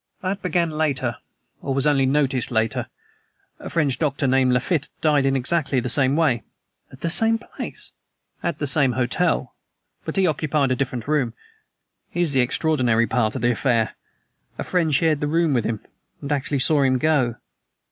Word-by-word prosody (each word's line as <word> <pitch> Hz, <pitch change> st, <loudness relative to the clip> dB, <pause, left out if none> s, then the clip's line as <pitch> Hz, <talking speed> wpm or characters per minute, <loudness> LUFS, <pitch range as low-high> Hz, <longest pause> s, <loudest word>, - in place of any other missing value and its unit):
"That 195 Hz, +2 st, -2 dB
began 170 Hz, -2 st, 0 dB
later, 140 Hz, -7 st, -1 dB, 0.4 s
or 135 Hz, -, -2 dB
was 135 Hz, 0 st, +1 dB
only 140 Hz, -3 st, +3 dB
noticed 135 Hz, -2 st, +1 dB
later. 110 Hz, -2 st, -1 dB, 0.7 s
A -, -, -7 dB
French 145 Hz, -6 st, +1 dB
doctor, 140 Hz, -2 st, 0 dB
named 130 Hz, -1 st, +3 dB
Lafitte, 135 Hz, +5 st, 0 dB
died 145 Hz, -3 st, +2 dB
in 135 Hz, -, +2 dB
exactly 135 Hz, +1 st, +1 dB
the 125 Hz, +1 st, -3 dB
same 135 Hz, 0 st, +2 dB
way." 150 Hz, -8 st, +2 dB, 0.5 s
"At 130 Hz, -, -14 dB
the 165 Hz, -, -1 dB
same 225 Hz, +6 st, +3 dB
place?" 225 Hz, -, -8 dB, 0.5 s
"At 170 Hz, -, -2 dB
the 145 Hz, -, -2 dB
same 140 Hz, -2 st, +2 dB
hotel; 130 Hz, +9 st, 0 dB, 0.5 s
but -, -, -5 dB
he 195 Hz, -1 st, +3 dB
occupied 150 Hz, -3 st, 0 dB
a -, -, +2 dB
different 125 Hz, -2 st, -3 dB
room. 135 Hz, -6 st, 0 dB, 0.7 s
Here 175 Hz, -, -2 dB
is 165 Hz, -, +1 dB
the 130 Hz, -, +4 dB
extraordinary 125 Hz, -3 st, +2 dB
part 115 Hz, -3 st, 0 dB
of -, -, -4 dB
the 120 Hz, -, +4 dB
affair: 115 Hz, -2 st, +1 dB, 0.6 s
a -, -, -3 dB
friend 170 Hz, -4 st, 0 dB
shared 155 Hz, +1 st, +2 dB
the 150 Hz, -, -1 dB
room 165 Hz, 0 st, +2 dB
with 120 Hz, -3 st, +1 dB
him, 110 Hz, -2 st, -2 dB, 0.4 s
and 140 Hz, -, -6 dB
actually 140 Hz, 0 st, 0 dB
saw 145 Hz, +2 st, +2 dB
him 130 Hz, -1 st, +3 dB
go!" 130 Hz, -4 st, +1 dB
140 Hz, 175 wpm, -22 LUFS, 125-155 Hz, 0.7 s, the